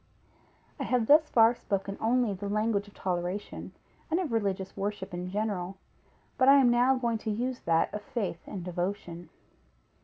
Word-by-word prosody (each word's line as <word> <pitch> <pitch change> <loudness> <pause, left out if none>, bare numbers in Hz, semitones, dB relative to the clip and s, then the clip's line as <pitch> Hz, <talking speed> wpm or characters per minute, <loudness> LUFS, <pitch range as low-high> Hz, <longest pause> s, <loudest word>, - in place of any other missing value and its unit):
I - - -1
have 245 -3 +1
thus 305 +4 +6
far 225 0 +6
spoken 195 -4 -3
only 235 -1 +2
the 200 +1 -5
language 210 0 0
of 205 - -17
toleration, 180 +2 -3 0.4
and 330 +2 +1
of 345 -8 -2
religious 195 -4 -1
worship 195 -2 -4
in 180 +1 -4
general, 195 -2 -2 0.6
but 260 +1 +6
I 275 - +9
am 250 -3 +5
now 250 +2 +4
going 235 -3 -1
to 220 - -4
use 245 +4 -2
that 165 0 +2
of 210 - -4
faith 205 -5 -3
and 190 -4 -6
devotion. 175 -2 -4
205 Hz, 165 wpm, -29 LUFS, 190-240 Hz, 0.6 s, I